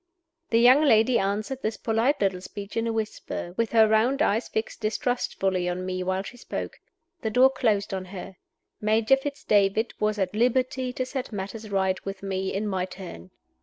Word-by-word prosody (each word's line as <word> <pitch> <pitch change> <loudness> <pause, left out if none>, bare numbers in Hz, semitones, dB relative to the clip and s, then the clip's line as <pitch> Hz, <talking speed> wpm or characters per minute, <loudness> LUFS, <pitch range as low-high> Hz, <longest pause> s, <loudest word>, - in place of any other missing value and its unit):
_" - - -52
The 230 - +3
young 250 +5 +7
lady 235 -4 +4
answered 210 +7 -2
this 220 -2 -2
polite 230 +6 +1
little 190 -2 +1
speech 200 +1 -8
in 230 0 0
a - - 0
whisper 215 -5 -4
with 230 0 0
her 220 -1 +6
round 240 +7 +3
eyes 220 -1 +1
fixed 220 - -3
distrustfully 195 -5 -1
on 180 +1 -3
me 185 0 -3
while 185 +1 -1
she 245 - -10
spoke. - - -6 0.4
The 220 - -1
door 255 +4 +5
closed 220 -7 0
on 190 -1 -3
her. 185 0 -9 0.4
Major 220 +4 +4
Fitz 280 +1 -6
David 205 +2 +2
was 215 0 +1
a 195 - +2
t 210 - -7
liberty 255 +1 +1
to 255 +1 -3
set 260 -1 -5
matters 210 +2 -6
right 190 -1 0
with 195 0 -6
me, 190 -1 -2
in 210 +2 -2
my 190 -2 -1
turn. 180 - -10
215 Hz, 195 wpm, -26 LUFS, 195-240 Hz, 0.4 s, young